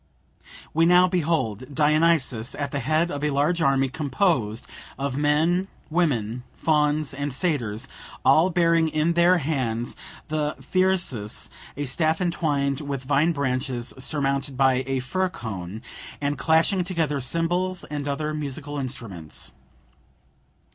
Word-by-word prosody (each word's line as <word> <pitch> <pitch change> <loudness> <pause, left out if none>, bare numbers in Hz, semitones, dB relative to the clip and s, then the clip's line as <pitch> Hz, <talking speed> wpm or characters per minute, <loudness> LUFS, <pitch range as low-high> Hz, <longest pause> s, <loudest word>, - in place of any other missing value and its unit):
We 165 +1 +4
now 180 +1 +6
behold 145 - -1
Dionysus 150 -6 +2
at 145 -1 -3
the 145 - -1
head 155 +6 +1
of 145 0 -4
a 150 - +2
large 150 +5 +1
army 135 -3 +3
composed 130 - 0 0.3
of 135 -1 -2
men, 155 +6 +2 0.2
women, 125 -9 0
fauns, 150 -2 +1
and 145 +1 -3
satyrs, 130 - -1 0.4
all 165 +4 +6
bearing 170 -2 +3
in 155 +2 +1
their 175 +2 +5
hands 130 -7 -2 0.3
the 150 -1 -1
Thyrsus 180 - 0 0.3
(a 145 - -2
staff 155 +4 +1
entwined 145 -6 0
with 140 -2 -4
vine 145 +5 +2
branches 130 -4 -2
surmounted 135 -1 -1
by 130 -1 +3
a 135 -1 0
fir 185 +8 -1
cone), 110 - -6 0.4
and 145 0 -1
clashing 160 +6 +2
together 160 -6 -1
cymbals 175 +6 0
and 145 -1 -5
other 150 +2 -2
musical 145 0 -4
instruments. 115 - -5
145 Hz, 125 wpm, -25 LUFS, 130-165 Hz, 0.4 s, now